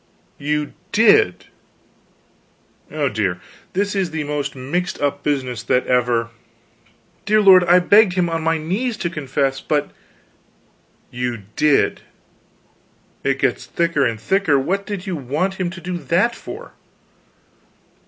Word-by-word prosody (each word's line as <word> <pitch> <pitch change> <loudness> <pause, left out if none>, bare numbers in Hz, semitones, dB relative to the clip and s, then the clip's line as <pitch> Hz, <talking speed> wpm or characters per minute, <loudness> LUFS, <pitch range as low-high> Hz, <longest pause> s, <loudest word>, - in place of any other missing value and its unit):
"You 150 +1 -2 0.2
did? 210 - +4 1.4
Oh, 150 -2 -1
dear, 100 -7 -1 0.3
this 200 +2 0
is 190 -3 0
the 160 -1 -3
most 145 -1 -3
mixed 155 +8 -3
up 145 0 -1
business 130 -6 -2
that 125 +2 +1
ever 120 -2 +1 0.5
" - - -36
"Dear 215 +1 +4
lord, 190 -3 +7
I 175 +1 +6
begged 200 +2 +5
him 180 -1 +1
on 165 -1 -2
my 165 0 +1
knees 205 +10 -2
to 170 - -3
confess, 135 -3 -2
but 145 -1 -1 0.6
" - - -38
"You 120 -4 -3
did! 150 -2 +2 1.2
It - - +1
gets - - -1
thicker 170 -4 0
and 115 -4 -1
thicker. 165 - +2
What 195 +9 -1
did 200 -3 -5
you 190 -3 -3
want 155 +8 -2
him 180 - 0
to 180 0 -9
do 175 0 -4
that 195 +9 +1
for?" 460 - -9
160 Hz, 140 wpm, -20 LUFS, 135-185 Hz, 1.4 s, lord